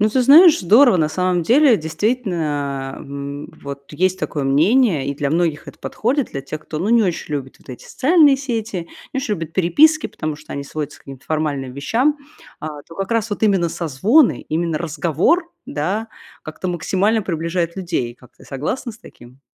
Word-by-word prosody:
Ну 215 - +4
ты 255 +4 +1
знаешь, 310 +6 +7
здорово, 225 +5 +5
на 155 -3 +1
самом 180 +1 0
деле, 250 - +5
действительно, 155 - -2
э, 140 +1 -8
вот 140 0 -9
есть 185 +4 0
такое 145 -3 -3
мнение, 165 - +3
и 140 - -2
для 140 0 -2
многих 165 -2 0
это - - -12
подходит, 260 +4 -1
для 135 - -4
тех, 145 +3 -7
кто 155 - -6
ну 185 +6 -2
не 235 0 +4
очень 170 -5 -2
любит 135 -2 -5
вот - - -24
эти 125 - -9
социальные 290 0 +4
сети, 225 -10 -4 0.2
не 270 - -2
очень 260 -6 -1
любит 165 -3 -6
переписки, 295 - +4
потому 155 -2 -5
что - - -11
они 140 - -4
сводятся 150 0 -6
к - - -22
каким-то 135 -2 -12
формальным 145 -4 -2
вещам, 240 - 0 0.4
а 150 -1 -6
то 165 - -15
как 195 -1 -4
раз 225 -1 0
вот 205 - -4
именно 195 -5 +3
созвоны, 180 - +2
именно 165 0 -1
разговор, 170 - 0 0.2
да, 190 +10 -2 0.3
как-то 155 +4 -6
максимально 190 +5 0
приближает 170 -1 -2
людей. 165 -10 -3
Как 125 +1 -21
ты, - - -17
согласна 155 - -4
с 215 - -16
таким? 125 - -16
170 Hz, 185 wpm, -19 LUFS, 145-225 Hz, 0.4 s, знаешь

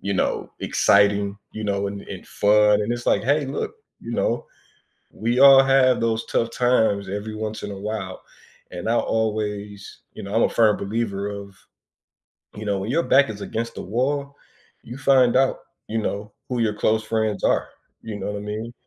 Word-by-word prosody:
you 100 +1 -2
know, - - -1
exciting, 100 0 +2
you 110 0 -6
know, 100 -1 -1
and, 100 0 -6
and - - -9
fun, 105 0 +3
and 115 +3 -1
it's, 120 0 -5
like, - - +2
"Hey, 145 +1 +2
look, 140 - -4 0.3
you - - -8
know, - - -1 0.7
we 120 +3 -1
all 135 -1 +9
have 135 -2 +3
those 115 -1 0
tough 115 0 -1
times 110 -6 +1
every 105 +2 -5
once 110 0 -5
in 105 - -5
a 95 - -7
while" 100 -3 -5 0.5
and 90 +4 -4
I 115 - +2
always 105 -2 -3
you - - -9
know, 100 +2 -5
I'm 115 - +4
a - - +3
firm 110 -3 +3
believer 100 -1 -3
of, 100 -1 -8 1.0
you 110 - -7
know, 100 -2 -1
"When 100 - -4
your 170 +6 +2
back 135 -4 +4
is 105 - -7
against 115 +3 -4
the - - -5
wall, 140 +6 -2 0.5
you 120 +3 -9
find 130 -3 +4
out, 135 0 +2 0.3
you 110 +1 -2
know, 105 0 -4 0.2
who 125 -1 -2
your 110 -2 +1
close 110 +1 +1
friends 110 -2 -1
are," - - +2 0.3
you 110 -2 -6
know 105 +1 -4
what 105 - -4
I - - -7
mean? 105 +3 -5
110 Hz, 190 wpm, -23 LUFS, 100-120 Hz, 1.0 s, all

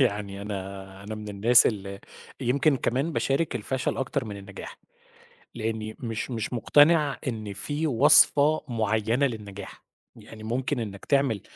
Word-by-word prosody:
يعني 100 -5 -1
أنا 95 -1 -7
أنا 110 +2 -6
من 105 -1 -8
الناس 115 +4 +5
ال 100 -3 -3 0.4
يمكن 140 +3 +2
كمان 135 +7 -1
باشارك 140 +4 0
الفَشَل 130 -1 -2
أكتر 135 0 -2
من 105 -2 -7
النجاح، 100 0 -10 0.8
لإنّي 110 -1 -4
مش 115 +1 -4
مش 115 -1 -4
مقتنع 145 +4 +4
إن 110 -4 -4
فيه 145 +10 -3
وصفة 145 +3 +5
معيّنة 110 +3 +1
للنجاح، 105 -5 -8 0.3
يعني 110 -1 -12
ممكن 130 +3 -2
إنَّك 100 -3 -6
تعمل 135 -8 +1
115 Hz, 135 wpm, -26 LUFS, 105-135 Hz, 0.8 s, الناس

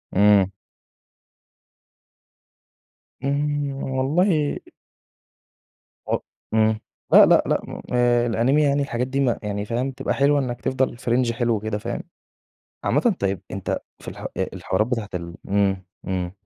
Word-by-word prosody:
إمم. 100 -1 +5 2.7
إمم 145 0 0
والله 150 +4 +1 1.5
و - - +2 0.4
إمم. 110 0 +3 0.3
لأ، - - +9
لأ، - - +5
لأ. - - +1
م - - -7
آآ 120 -1 +3
الأنيميا 135 +6 +3
يعني 140 +1 +2
الحاجات 125 -2 -1
دي 135 +1 -2
م 125 -4 +2
يعني 105 0 -3
فاهم 125 +5 -1
تبقى 135 +1 -2
حلوة 140 +1 +3
إنّك 125 -3 -3
تفضل 130 -2 0
في 120 -1 -3
رينج 120 -1 +2
حلو 115 -2 0
كده 110 0 -3
فاهم؟ 120 +3 -4 0.8
عامةً 235 -5 +2
طيب 100 -1 0
أنت - - -2 0.2
في - - -12
الح - - -6
الحوارات 105 +4 -1
بتاعة 115 -5 -2
ال 85 -1 -5
إمم، 95 -1 +1 0.2
إمم. 90 -2 -2
120 Hz, 130 wpm, -23 LUFS, 105-135 Hz, 2.7 s, لأ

